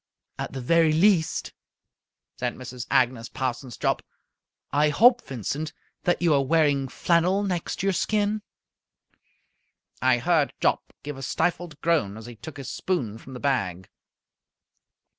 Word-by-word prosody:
"At - - -3
the 135 - -4
very 165 +4 +4
least," 170 -1 +2 0.9
said 125 -1 -1
Mrs. 125 -1 -7
Agnes 125 -2 +2
Parsons 130 -2 -4
Jopp, - - 0 0.7
"I 150 +2 +3
hope, 240 - +6
Vincent, 140 +5 -4 0.3
that 175 0 +1
you 165 -3 +4
are 140 -1 +3
wearing 145 -2 +2
flannel 175 +8 +2
next 180 -2 -2
your 195 0 +2
skin." 210 +3 0 1.6
I 130 -1 +4
heard 155 +2 +2
Jopp - - +1
give 145 -1 -6
a - - -8
stifled 170 +2 -1
groan 150 -12 +1
as 110 - -9
he 120 -1 -9
took 145 +6 -10
his 140 - -6
spoon 120 - -2
from 130 - -12
the - - -6
bag. 95 -11 -1
145 Hz, 140 wpm, -26 LUFS, 125-170 Hz, 1.6 s, hope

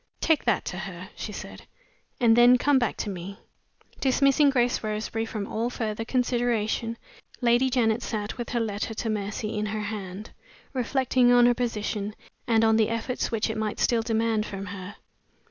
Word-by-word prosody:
"Take 320 -2 +2
that - - +1
to - - -4
her," - - -7
she - - -5
said, - - -9 0.5
"and 230 -3 +5
then 240 +1 +7
come 285 +1 +3
back 240 - -1
to - - -3
me." 190 +2 -7 0.6
Dismissing 275 +2 +4
Grace 245 -2 +1
Roseberry 215 +1 -2
from 215 -2 -4
all 225 +4 -2
further 225 -2 -3
consideration, 235 -2 0 0.4
Lady 245 +1 +3
Janet 235 -3 +2
sat, 210 -3 -3
with 240 -2 -5
her 240 - 0
letter 220 0 -3
to 225 - -3
Mercy 210 +1 -3
in 210 0 -1
her 215 +1 -3
hand, 205 -1 -6 0.4
reflecting 255 -1 +2
on 245 0 +6
her 245 - +5
position, 215 -3 -3 0.3
and 225 -1 +3
on 220 0 +4
the 220 -1 +3
efforts 230 +2 -2
which 225 -2 0
it 220 -1 -3
might 215 -1 -2
still 235 -2 +2
demand 225 -1 +1
from 195 0 -6
her. 190 0 -7
225 Hz, 175 wpm, -26 LUFS, 215-245 Hz, 0.6 s, then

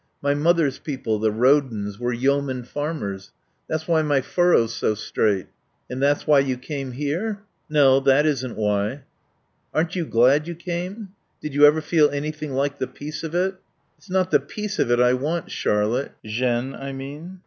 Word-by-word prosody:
My 140 0 +1
mother's 155 -2 +2
people, 130 -7 -3
the 110 +1 +2
Rodens, 115 -4 +1
were 120 0 -1
yeoman 130 +1 0
farmers. 120 -9 -5 0.4
That's 155 0 -3
why 165 -2 +3
my 145 -3 +2
furrow's 135 -7 +2
so 110 - 0
straight." 105 -2 0 0.5
"And 130 +1 -4
that's 145 +1 +2
why 150 -2 +5
you 135 -2 0
came 135 0 -5
here?" 175 - -3 0.3
"No. 140 -3 +5
That 135 +2 +4
isn't 130 -5 -1
why." 105 +5 -1 0.7
"Aren't 160 +3 0
you 170 -4 -2
glad 135 +7 +4
you 170 - -5
came? 180 +5 -5 0.3
Did 150 -2 -6
you 145 +1 +7
ever 155 +2 +3
feel 155 -2 +3
anything 150 0 -4
like 140 +2 -1
the 130 - -1
peace 150 +3 -7
of 160 +1 -5
it?" 190 +2 0 0.4
"It's 195 - -21
not 185 0 +1
the - - +5
peace 210 -1 -6
of - - +2
it 120 0 +3
I 125 0 +5
want, 150 +6 -2
Charlotte, 110 +6 0
Jeanne, 120 +3 -1
I 135 0 -6
mean. 145 +7 -8
140 Hz, 175 wpm, -23 LUFS, 125-155 Hz, 0.7 s, you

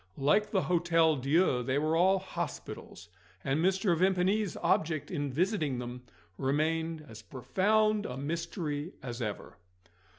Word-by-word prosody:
Like 150 +10 +2
the 190 -3 +1
Hotel 165 -2 +3
Dieu, 140 0 +2
they 130 +3 -1
were 155 +2 +1
all 190 +3 +4
hospitals; 185 - -6 0.3
and 140 +4 0
Mr. 190 -1 +2
Vimpany's 190 +3 +1
object 160 +1 +1
in 145 -5 -2
visiting 155 - 0
them 125 0 -6 0.4
remained 155 +3 0
as 110 -3 -11
profound 210 - +1
a 125 - -6
mystery 155 +1 -3
as 120 -1 -5
ever. 105 -3 -5
160 Hz, 130 wpm, -30 LUFS, 135-185 Hz, 0.4 s, all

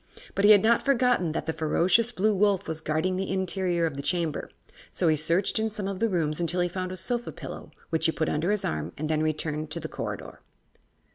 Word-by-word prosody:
But 200 - +1
he - - +7
had 205 -2 +7
not 230 +1 +4
forgotten 250 - +2
that - - -3
the 160 - -1
ferocious 185 +9 +2
Blue 215 -1 +1
Wolf 200 -1 +2
was 160 0 -4
guarding 160 +4 0
the 190 0 -2
interior 185 -2 0
of 155 -4 -3
the - - -3
Chamber, 165 0 -1 0.4
so 175 - 0
he 155 - +4
searched 165 +8 +1
in 220 0 0
some 210 -2 -5
of 195 -1 -4
the 230 - +2
rooms 160 -5 0
until 175 +1 -1
he 175 - +2
found 185 +1 -4
a 185 - -5
sofa 240 +5 -2
pillow, - - -8 0.2
which 160 0 +1
he - - +2
put 155 +1 -1
under 155 +5 0
his 210 -1 +1
arm 75 -1 -3
and 155 +1 -3
then 155 0 +1
returned 155 0 -2
to - - -3
the - - -5
corridor. - - -6
180 Hz, 230 wpm, -27 LUFS, 155-200 Hz, 0.4 s, he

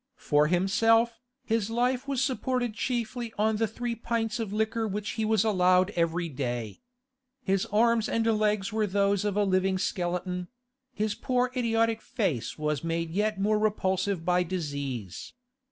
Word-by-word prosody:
For 150 0 +2
himself, 225 +6 +2 0.2
his 225 -3 0
life 245 +3 0
was 270 -2 0
supported 255 -3 -1
chiefly 235 0 -3
on 215 +1 +2
the 225 +1 +1
three 240 +2 -4
pints 230 0 -2
of 220 -4 -3
liquor 220 +1 0
which 210 +1 -3
he 220 - -2
was 220 -2 +3
allowed 185 -2 +3
every 170 -1 0
day. 120 - -4 0.6
His 195 -3 0
arms 225 +1 +2
and 225 0 0
legs 215 -2 +1
were 215 -1 +1
those 200 0 +1
of 205 -1 -1
a 210 - +4
living 190 -1 +1
skeleton; 180 -1 -2 0.4
his 215 -3 -1
poor 250 +2 0
idiotic 230 -2 +1
face 190 - -2
was 150 -1 -1
made 165 0 -2
yet 210 +2 0
more 210 +2 +2
repulsive 190 -4 0
by 180 0 +3
disease. 140 - -4
210 Hz, 155 wpm, -28 LUFS, 180-225 Hz, 0.6 s, a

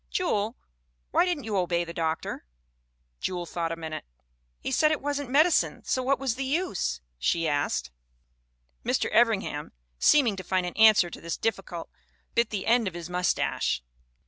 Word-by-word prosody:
" - - -43
'Jewel, 225 - 0 0.5
why - - +4
didn't 350 -6 -1
you 215 -2 -3
obey 175 -1 +1
the 170 0 -7
doctor?'... 160 - -2 0.8
"Jewel 175 -2 -2
thought 165 0 -3
a - - -2
minute. 160 -1 -6 0.3
" - - -45
'He - - -2
said 305 +4 +4
it 310 - +1
wasn't 285 -1 -3
medicine, 310 +5 +3
so 260 - 0
what 270 +2 +2
was 265 -4 -1
the 265 +3 -3
use?' 265 - -1 0.2
she 165 - +1
asked. 145 - 0 0.9
"Mr. - - 0
Evringham, - - +2 0.3
seeming 260 -9 +5
to 185 - -5
find 185 0 0
an 180 - -4
answer 215 -5 +6
to - - -9
this 170 0 -3
difficult, 195 -6 -3 0.5
bit 235 -1 +2
the 205 -3 -3
end 235 -1 +3
of 180 - -4
his 175 0 -7
mustache." 180 - 0
190 Hz, 170 wpm, -27 LUFS, 170-260 Hz, 0.9 s, answer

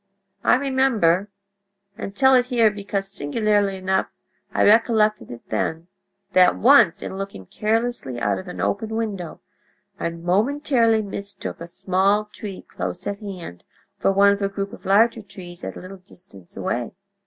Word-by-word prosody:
I - - +5
remember—and 200 -6 -2
tell 265 +2 +5
it 250 -1 +4
here 230 -4 +3
because, 200 -1 -3
singularly 200 +3 0
enough, 190 0 0 0.4
I - - +1
recollected 215 -1 +3
it 120 - -10
then—that 185 - 0
once, 235 -8 +5
in 190 - -6
looking 195 - -7
carelessly 220 - -2
out 105 -4 0
of - - -10
an 90 - -8
open 215 - -1
window, 205 -7 -4 0.6
I - - -1
momentarily 225 - +1
mistook 200 -3 -7
a 170 - -6
small 195 +4 +1
tree 200 -3 -8
close 180 +1 -5
at 200 0 -3
hand 180 - -8 0.4
for - - +2
one 200 +1 +5
of 200 0 -1
a 200 - 0
group 200 0 -5
of - - -12
larger 225 +4 +4
trees 180 -3 -12
at - - -5
a - - -8
little 185 +2 -10
distance 175 - -16
away. 120 -1 -3
200 Hz, 150 wpm, -22 LUFS, 185-215 Hz, 0.6 s, I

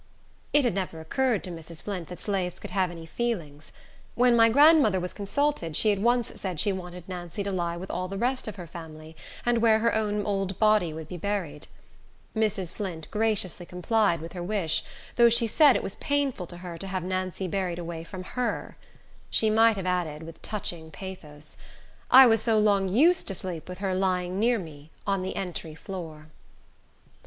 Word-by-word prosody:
It 295 - +4
had 240 - +2
never 185 -4 -3
occurred 235 +8 0
to 180 - -6
Mrs. 165 -1 -9
Flint 185 -6 -4
that 180 - -9
slaves 190 -4 -2
could - - -8
have 190 -2 +1
any 165 -1 -9
feelings. 160 -8 -4 0.4
When 245 0 +4
my 230 -1 +6
grandmother 285 - +6
was 180 0 -4
consulted, 205 - -1
she 215 - +5
at 200 - 0
once 240 +2 +2
said 185 -5 -3
she 205 +2 +2
wanted 180 -2 -8
Nancy 180 +1 -5
to 200 - -3
lie 170 -2 -2
with 185 +2 -6
all 185 +1 -2
the 195 +1 -5
rest 250 +4 -1
of 215 - -5
her 180 -3 -8
family, 160 -1 -10 0.3
and 240 -1 +3
where 225 -1 +5
her 230 +1 +1
own 210 -2 0
old 195 -2 -1
body 215 -6 +3
would 160 0 -7
be 180 - -7
buried. 175 -6 -3 0.7
Mrs. 210 -5 0
Flint 175 -6 -5
graciously 210 -5 +1
complied 180 0 +1
with 165 - -8
her 180 - -5
wish, 175 -3 0 0.3
though 235 -1 +7
she 235 +1 +4
said 280 +4 +5
it - - -1
was 195 - -3
painful 280 -10 -1
to 175 - -7
her 175 -2 -8
to 195 - -6
have 185 -2 -3
Nancy 185 0 -2
buried 180 -1 -2
away 170 -1 -5
from 185 +2 -8
her. 245 +5 -3 0.5
She 220 -1 +3
might 225 +1 +5
have 190 - -4
added 170 -4 -1
with 165 0 -11
touching 175 -6 -4
pathos, 155 -5 -9 0.5
"I 265 +1 +10
was 225 -3 +4
so 225 -2 +2
long 200 -2 +3
used 320 - +4
to 195 - -1
sleep 180 -2 -5
with 180 - -6
her 190 0 -2
lying 185 0 0
near 235 +2 +3
me, 155 -5 -9 0.2
on 195 -2 0
the 185 - -4
entry 170 -4 -5
floor." 160 -4 -8
190 Hz, 195 wpm, -27 LUFS, 170-220 Hz, 0.7 s, I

